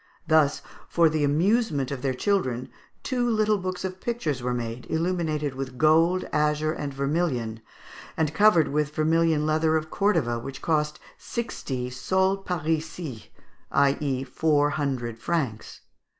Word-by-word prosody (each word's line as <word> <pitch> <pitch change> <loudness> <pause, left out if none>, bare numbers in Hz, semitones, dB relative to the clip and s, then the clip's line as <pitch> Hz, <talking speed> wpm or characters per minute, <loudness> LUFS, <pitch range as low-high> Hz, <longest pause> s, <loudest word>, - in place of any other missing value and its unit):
Thus, 155 -3 +3 0.3
for 170 -2 +4
the 155 -1 0
amusement 155 - +1
of 135 -3 -4
their 130 -1 -1
children, 130 - 0 0.3
two 245 -2 0
little 215 -2 +2
books 185 0 -4
of 185 0 -6
pictures 165 - -2
were 125 +1 -1
made, 120 0 -4
illuminated 160 -4 -1
with 130 -1 -6
gold, 165 +5 +4
azure, 150 0 +1
and 145 -3 -4
vermilion, 140 -5 -1 0.6
and 155 -1 0
covered 175 -4 +5
with 150 +1 -1
vermilion 160 -1 +2
leather 155 +1 +2
of 155 0 -5
Cordova, 165 - +1
which 135 +3 -7
cost 150 -2 0 0.2
sixty 130 - -4
_sols 190 +9 0
parisis, 160 - -3 0.4
i.e. 140 -1 +1
four 145 +2 +1
hundred 125 -6 -2
francs. 130 -7 -3
155 Hz, 135 wpm, -26 LUFS, 135-170 Hz, 0.6 s, covered